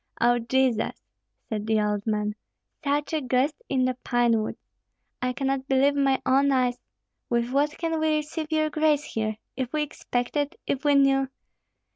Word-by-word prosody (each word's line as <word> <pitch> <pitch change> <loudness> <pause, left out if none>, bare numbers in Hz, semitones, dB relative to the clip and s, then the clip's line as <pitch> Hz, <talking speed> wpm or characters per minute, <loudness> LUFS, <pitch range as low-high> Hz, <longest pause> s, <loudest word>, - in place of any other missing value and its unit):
"O 240 0 +4
Jesus!" 240 -1 +1 0.5
said 215 -1 -3
the 220 -1 +3
old 210 0 -1
man, 210 -1 0 0.5
"such 290 +2 0
a 310 - +1
guest 260 +3 +1 0.2
in 260 -2 +2
the 255 - +1
pine 240 -2 +2
woods. 215 - -4 0.6
I 250 0 0
cannot 270 +1 -2
believe 275 +1 +4
my 275 -2 +2
own 275 +2 +4
eyes. 250 -2 +1 0.5
With 235 0 0
what 290 +3 +1
can 325 -1 -1
we 315 -1 +2
receive 305 +1 -3
your 310 -1 +1
grace 305 -1 +2
here? 220 -5 -3 0.2
If 260 -1 -3
we 305 -1 +1
expected, 285 0 -2
if 275 - -2
we 290 -1 +4
knew!" 270 -1 +4
265 Hz, 165 wpm, -26 LUFS, 240-290 Hz, 0.6 s, O